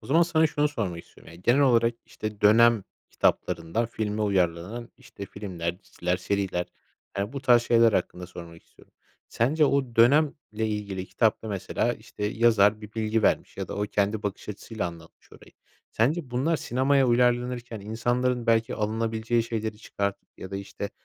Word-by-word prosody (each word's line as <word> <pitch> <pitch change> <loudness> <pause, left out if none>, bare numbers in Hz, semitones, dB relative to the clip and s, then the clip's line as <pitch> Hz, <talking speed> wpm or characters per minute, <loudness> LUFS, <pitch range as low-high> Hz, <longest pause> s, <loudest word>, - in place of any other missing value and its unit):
O 110 - -14
zaman 160 +6 +4
sana 160 -2 +3
şunu 150 0 +1
sormak 95 -12 -4
istiyorum, - - -17
yani, 85 +2 -15
genel 120 +6 +4
olarak, 120 -4 +4
işte, 110 0 -6
dönem 115 0 +5 0.3
kitaplarından 85 +6 0
filme 110 -2 -3
uyarlanan, 95 +3 -1
işte, 100 - -10
filmler, 90 -4 -5
diziler, 90 -2 -2
seriler 95 -2 -1 0.5
yani 100 +3 -2
bu 140 - -5
tarz 120 -3 +5
şeyler 115 -2 +4
hakkında 90 -1 -2
sormak 85 -2 -11
istiyorum. - - -23 0.4
Sence 150 +7 +2
o 135 -5 0
dönemle 140 +6 +5 0.2
ilgili 105 -3 -3
kitapta, 110 -1 0
mesela, 100 -3 -1
işte, 105 - -8
yazar 110 -1 +3
bir 105 0 -11
bilgi 110 0 0
vermiş - - +1
ya - - -5
da - - -5
o 100 - -1
kendi 105 +1 0
bakış 100 -1 -5
açısıyla 105 -1 -4
anlatmış 85 -1 -12
orayı. - - -16 0.4
Sence 135 +4 0
bunlar 145 +7 +1
sinemaya 135 +2 +2
uyarlanırken 120 -1 +1
insanların, 120 +3 -1
belki, 115 0 +2
alınabileceği 110 +2 0
şeyleri 110 -2 -4
çıkartıp 100 -2 -4
ya 95 - -8
da, 95 - -3
işte, 100 +1 -6
110 Hz, 160 wpm, -26 LUFS, 100-120 Hz, 0.5 s, dönem